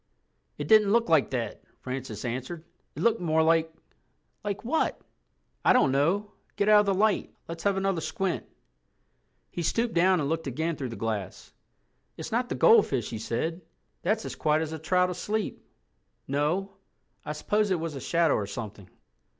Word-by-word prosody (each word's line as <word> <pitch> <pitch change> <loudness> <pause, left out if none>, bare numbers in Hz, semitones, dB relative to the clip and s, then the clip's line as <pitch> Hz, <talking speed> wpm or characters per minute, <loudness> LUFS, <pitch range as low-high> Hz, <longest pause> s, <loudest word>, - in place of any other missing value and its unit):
"It 145 - -4
didn't 210 0 +6
look 230 +1 +3
like 160 -4 +4
that," 120 -5 -3 0.2
Francis 125 -5 -5
answered. 130 +7 -4 0.3
"It - - -4
looked 230 -2 +3
more 160 -2 +2
like—" 165 0 +3 0.7
"Like 205 +1 -4
what?" 315 +6 0 0.6
"I - - +6
don't 250 - +4
know—get 200 +8 -1
out 210 0 +7
of 210 - +3
the 195 - +3
light. 210 +1 +1 0.2
Let's 165 +1 -7
have 200 -1 +2
another 195 -3 0
squint." 175 +4 -2 1.1
He 175 - -4
stooped 230 +7 0
down 180 +1 +4
and 145 - -1
looked 160 0 -2
again 160 +6 -2
through 135 -3 -4
the 115 - -6
glass. 110 -5 -4 0.6
"It's - - -6
not 245 +2 0
the - - -2
goldfish," 140 - +4
he 110 - -4
said. 160 +10 -2 0.4
"That's 215 +5 0
as - - -5
quiet 155 +1 +1
as 160 0 -5
a 160 - -5
trout 180 +3 +2
asleep. 210 +4 -3 0.6
No—I 175 +3 -4
suppose 205 +7 0
it 185 -3 +1
was 165 -1 -4
a 135 - -6
shadow 165 0 +2
or 100 - -1
something." 100 -3 -7
165 Hz, 165 wpm, -27 LUFS, 140-200 Hz, 1.1 s, out